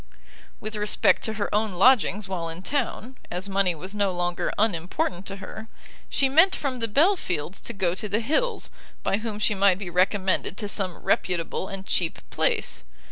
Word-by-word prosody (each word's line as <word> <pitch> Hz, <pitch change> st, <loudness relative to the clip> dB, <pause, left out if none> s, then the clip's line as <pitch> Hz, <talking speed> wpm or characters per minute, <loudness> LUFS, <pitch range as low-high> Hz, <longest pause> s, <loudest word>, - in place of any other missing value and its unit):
With 215 Hz, 0 st, -5 dB
respect 210 Hz, 0 st, +3 dB
to 220 Hz, -, -2 dB
her 210 Hz, -2 st, -3 dB
own 210 Hz, -1 st, +1 dB
lodgings 210 Hz, 0 st, +4 dB
while 175 Hz, -3 st, -3 dB
in 165 Hz, +3 st, -7 dB
town, 260 Hz, -1 st, -2 dB
as 180 Hz, +3 st, -3 dB
money 195 Hz, -3 st, +1 dB
was 185 Hz, +6 st, -5 dB
no 200 Hz, -2 st, +1 dB
longer 175 Hz, -1 st, -1 dB
unimportant 180 Hz, -2 st, -1 dB
to 195 Hz, -, -4 dB
her, 220 Hz, +2 st, -8 dB, 0.4 s
she 275 Hz, -, +2 dB
meant 325 Hz, +8 st, +5 dB
from 270 Hz, -3 st, -2 dB
the 230 Hz, -1 st, -1 dB
Belfields 205 Hz, -, +1 dB
to -, -, -5 dB
go 190 Hz, -5 st, 0 dB
to 205 Hz, +3 st, -4 dB
the 205 Hz, +3 st, +1 dB
Hills, 315 Hz, -, 0 dB, 0.3 s
by 195 Hz, -, +1 dB
whom 220 Hz, -1 st, -4 dB
she 210 Hz, 0 st, +2 dB
might 195 Hz, -2 st, +4 dB
be 190 Hz, -3 st, -6 dB
recommended 190 Hz, +1 st, +1 dB
to 210 Hz, -, -3 dB
some 190 Hz, -3 st, -2 dB
reputable 180 Hz, +1 st, 0 dB
and 195 Hz, 0 st, -6 dB
cheap 170 Hz, -4 st, -1 dB
place. -, -, 0 dB
200 Hz, 180 wpm, -25 LUFS, 185-220 Hz, 0.4 s, meant